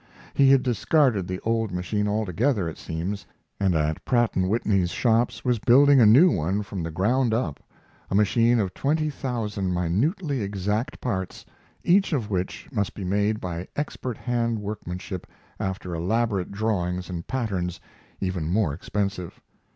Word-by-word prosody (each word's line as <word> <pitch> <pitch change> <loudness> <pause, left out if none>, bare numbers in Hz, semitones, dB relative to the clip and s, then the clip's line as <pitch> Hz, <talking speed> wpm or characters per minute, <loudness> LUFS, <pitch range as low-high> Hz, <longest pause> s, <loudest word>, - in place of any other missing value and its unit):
He 135 -1 +5
had 135 -1 +5
discarded 125 - +2
the 95 0 -3
old 115 -2 0
machine 95 +4 -1
altogether, 105 - 0
it 80 - -7
seems, 90 +5 -4 0.3
and 95 -3 +2
at 75 0 0
Pratt 120 -3 +2
& - - -23
Whitney's 95 -1 +1
shops 115 +5 +1
was 125 -2 +2
building 135 +4 +6
a 110 - +7
new 145 +12 +7
one 95 +5 0
from 95 -2 -5
the 85 - -3
ground 110 +8 +1
up 80 - -2 0.5
a - - -1
machine 115 +3 +3
of 95 -4 -1
twenty 155 +5 0
thousand 105 -9 -2
minutely 130 - 0
exact 105 +6 -2
parts, 95 -7 -3 0.4
each 190 0 +3
of 115 -7 -1
which 95 -1 -3
must 105 -6 -2
be 100 - -6
made 105 +3 +1
by 90 -1 -5
expert 130 -5 -4
hand 115 -2 -1
workmanship 95 -3 -6 0.3
after 95 -2 -3
elaborate 100 +2 0
drawings 90 -4 -1
and 85 -2 -6
patterns 95 -9 -2 0.4
even 90 -5 -2
more 95 -5 +1
expensive. 95 +1 -3
105 Hz, 150 wpm, -25 LUFS, 90-120 Hz, 0.5 s, a